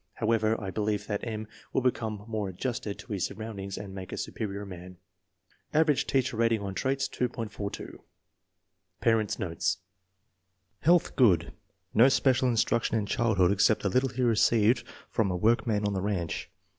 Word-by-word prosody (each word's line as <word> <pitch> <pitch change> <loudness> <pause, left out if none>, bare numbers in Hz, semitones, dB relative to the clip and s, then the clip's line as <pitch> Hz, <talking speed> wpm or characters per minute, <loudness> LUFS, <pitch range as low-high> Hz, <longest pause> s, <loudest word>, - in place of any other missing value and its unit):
"However, 110 -1 +1
I 100 -3 -4
believe 105 0 -1
that 105 -1 -3
M. 110 -2 -4 0.2
will 130 - 0
become 110 -5 -1
more 110 -3 -2
adjusted 105 +1 -3
to 115 - -7
his 95 - -1
surroundings 100 -3 -6
and 100 -2 -7
make 95 -2 -7
a - - -5
superior 100 -1 -4
man." 90 -1 -10 0.8
Average 155 -3 +3
teacher 130 -4 +1
rating 115 -1 +3
on 100 -1 -4
traits, 135 +6 0
2.42. 115 -4 -4 1.0
Parents' 110 0 +2
notes. 90 0 -1 1.0
Health 175 +2 +3
good. 100 - +4 0.4
No 120 +5 +7
special 130 -1 +3
instruc 115 0 +2
tion 115 - +1
in 105 - -1
childhood 100 -4 +2
except 100 +2 +3
the 100 - +2
little 130 +6 +2
he 125 +1 -2
received 115 0 +3 0.2
from 110 -4 0
a 90 - -1
workman 110 +1 +2
on 100 - 0
the 95 - -1
ranch. 95 -4 -2
110 Hz, 155 wpm, -29 LUFS, 100-120 Hz, 1.0 s, No